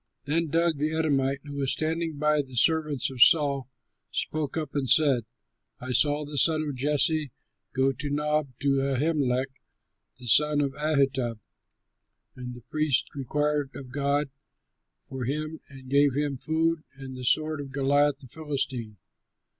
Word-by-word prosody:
Then 165 Hz, +3 st, 0 dB
Doeg 165 Hz, -1 st, +1 dB
the 155 Hz, +2 st, -1 dB
Edomite, 140 Hz, -3 st, 0 dB
who 145 Hz, -, -8 dB
was 135 Hz, -2 st, +1 dB
standing 160 Hz, 0 st, -2 dB
by 150 Hz, 0 st, +2 dB
the 130 Hz, -2 st, -11 dB
servants 150 Hz, -1 st, +2 dB
of 130 Hz, -2 st, -5 dB
Saul, 140 Hz, -4 st, +5 dB, 0.4 s
spoke 155 Hz, 0 st, -3 dB
up 155 Hz, -3 st, -4 dB
and 135 Hz, -3 st, -2 dB
said, 135 Hz, -3 st, +4 dB, 0.5 s
"I 130 Hz, 0 st, -6 dB
saw 145 Hz, +3 st, +3 dB
the 145 Hz, -1 st, -2 dB
son 155 Hz, +1 st, +4 dB
of 145 Hz, -2 st, -4 dB
Jesse 145 Hz, +2 st, +1 dB, 0.4 s
go 135 Hz, +1 st, +2 dB
to 145 Hz, +2 st, -5 dB
Nob, 150 Hz, +1 st, 0 dB
to 140 Hz, -1 st, +2 dB
Ahimelech, 135 Hz, -2 st, 0 dB, 0.7 s
the 125 Hz, -, -12 dB
son 150 Hz, +5 st, +4 dB
of 140 Hz, -2 st, 0 dB
Ahitub. 135 Hz, -5 st, 0 dB, 1.0 s
And 125 Hz, -1 st, -7 dB
the 120 Hz, -, -11 dB
priest 155 Hz, -1 st, 0 dB
inquired 145 Hz, +1 st, -1 dB
of 130 Hz, -3 st, -9 dB
God 140 Hz, +1 st, 0 dB, 0.8 s
for 130 Hz, -2 st, -5 dB
him 155 Hz, +4 st, -3 dB
and 135 Hz, -2 st, -13 dB
gave 140 Hz, 0 st, +3 dB
him 145 Hz, -1 st, -1 dB
food 160 Hz, +4 st, 0 dB, 0.2 s
and 135 Hz, -1 st, -8 dB
the 125 Hz, -, -8 dB
sword 155 Hz, +3 st, +2 dB
of 140 Hz, -1 st, -9 dB
Goliath 140 Hz, +1 st, +2 dB
the 135 Hz, -, -11 dB
Philistine." 130 Hz, -6 st, -4 dB
145 Hz, 155 wpm, -26 LUFS, 135-150 Hz, 1.0 s, Saul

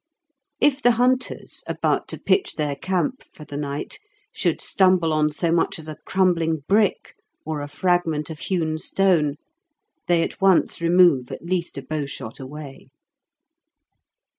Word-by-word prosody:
If 285 Hz, -1 st, +3 dB
the 245 Hz, -1 st, +5 dB
hunters, 255 Hz, +2 st, 0 dB
about -, -, 0 dB
to -, -, -5 dB
pitch 390 Hz, -, +1 dB
their 150 Hz, -2 st, -1 dB
camp 190 Hz, -, -1 dB
for 150 Hz, -, -14 dB
the 145 Hz, -, -9 dB
night, 145 Hz, 0 st, -4 dB, 0.3 s
should -, -, 0 dB
stumble 185 Hz, -4 st, +3 dB
on 155 Hz, 0 st, +2 dB
so 165 Hz, +2 st, -1 dB
much 170 Hz, 0 st, +1 dB
as 160 Hz, -1 st, -9 dB
a 155 Hz, -, -5 dB
crumbling 165 Hz, -5 st, +1 dB
brick 205 Hz, 0 st, +2 dB, 0.3 s
or 155 Hz, -1 st, -3 dB
a 145 Hz, -, -5 dB
fragment 165 Hz, -1 st, 0 dB
of 155 Hz, -, -8 dB
hewn 160 Hz, -4 st, -1 dB
stone, 165 Hz, -6 st, +2 dB, 0.7 s
they 170 Hz, -1 st, +3 dB
at -, -, -6 dB
once 190 Hz, -3 st, +3 dB
remove 170 Hz, -7 st, +4 dB
at -, -, -7 dB
least 175 Hz, -3 st, -2 dB
a 140 Hz, -, -5 dB
bowshot 140 Hz, -5 st, -5 dB
away. 140 Hz, +1 st, -9 dB
165 Hz, 145 wpm, -23 LUFS, 150-185 Hz, 0.7 s, the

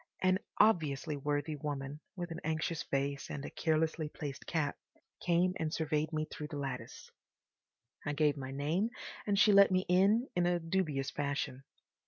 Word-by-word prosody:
An 185 Hz, 0 st, +4 dB, 0.2 s
obviously 160 Hz, -8 st, +3 dB
worthy 145 Hz, +2 st, -1 dB
woman, 145 Hz, 0 st, -4 dB, 0.2 s
with 175 Hz, -2 st, -5 dB
an 165 Hz, -, -4 dB
anxious 160 Hz, +1 st, -1 dB
face 140 Hz, 0 st, -2 dB
and 140 Hz, 0 st, -5 dB
a -, -, -6 dB
carelessly 160 Hz, -1 st, 0 dB
placed 145 Hz, -3 st, -6 dB
cap, 155 Hz, -4 st, 0 dB, 0.5 s
came 180 Hz, +1 st, +3 dB
and 160 Hz, -1 st, -1 dB
surveyed 155 Hz, -1 st, 0 dB
me 155 Hz, -1 st, -1 dB
through 150 Hz, -1 st, -7 dB
the 150 Hz, -, -6 dB
lattice. 135 Hz, -3 st, -5 dB, 0.9 s
I 145 Hz, -, -1 dB
gave 150 Hz, 0 st, +3 dB
my 135 Hz, -2 st, -6 dB
name 155 Hz, +10 st, 0 dB, 0.4 s
and 200 Hz, -1 st, +2 dB
she 210 Hz, -, +6 dB
let 200 Hz, 0 st, +8 dB
me 185 Hz, 0 st, +2 dB
in 200 Hz, +7 st, +4 dB
in 175 Hz, 0 st, +3 dB
a 175 Hz, 0 st, +2 dB
dubious 165 Hz, -5 st, -1 dB
fashion. 140 Hz, -2 st, -2 dB
155 Hz, 165 wpm, -33 LUFS, 145-175 Hz, 0.9 s, let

